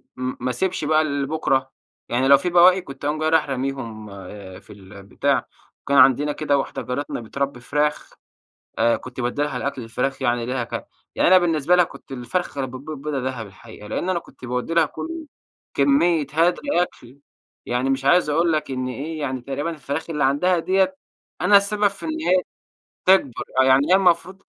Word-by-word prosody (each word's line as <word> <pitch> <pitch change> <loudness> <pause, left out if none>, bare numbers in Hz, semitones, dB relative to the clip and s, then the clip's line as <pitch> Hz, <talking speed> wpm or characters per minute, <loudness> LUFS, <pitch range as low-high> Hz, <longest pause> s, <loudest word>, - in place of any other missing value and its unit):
م 130 0 -3
ما 125 +1 -2
أسيبش 185 +8 -1
بقى 155 +1 +3
لبكرة. 140 -2 -1 0.4
يعني 125 +3 +1
لو 140 0 +8
في 180 +5 -2
بواقي، 180 +2 +6
كنت 135 -3 -10
أقوم 150 +1 -1
جاي 155 0 +1
رايح 160 -3 +2
راميهم 130 -5 -4 0.5
في - - -15
البتاع. 100 0 -2 0.4
وكان 140 - +1
عندنا 140 +2 +5
كده 145 -1 0
واحدة 135 - -3
جارتنا 125 0 -4
بترَبّي 140 +3 -3
فراخ 150 +4 -1 0.7
أ 115 - +3
كنت 130 0 -9
بادّي 125 +4 -1
لها 145 -3 -2
الأكل 135 0 -3
الفراخ 125 +4 -3
يعني 120 -2 0
ليها 125 -1 -2
ك - - -6 0.3
يعني - - +3
أنا 185 +1 +8
بالنسبة 170 -1 +2
لها 180 - +5
كنت 135 - -13
الفرخة 135 +6 -3
اللي - - -2
بتبيض 150 +2 -7
بيضة 150 -2 -2
دهب 125 -3 -4
الحقيقة. 105 +1 -13
لإن 175 - -3
أنا 180 - +1
كنت 145 - -15
باودّي 125 +6 -3
لها 170 - +4
كل 330 -1 -7 0.5
كميّة 145 +3 +3
هدر 170 +3 +2 0.2
أكل 130 -6 -8 0.5
يعني 125 +2 0
مش 135 0 -1
عايز 175 +4 +4
أقول 165 +2 +2
لك 155 -3 -1
إن 130 -1 -3
إيه، 155 +5 -5
يعني 130 -3 -3
تقريبًا 140 +5 -3
الفراخ 150 0 -5
اللي 150 -4 0
عندها 170 +7 +2
ديّة، 190 +10 +1 0.4
أنا 205 - +6
السبب 205 +1 +3
في 200 +9 -9
إن 315 0 -3
هي 185 - +2 0.6
تكبر. 185 -10 +3 0.2
آه. - - +6
يعني 130 +2 +4
هي - - +7
المفروض 190 +1 +1
140 Hz, 185 wpm, -22 LUFS, 130-170 Hz, 0.7 s, لو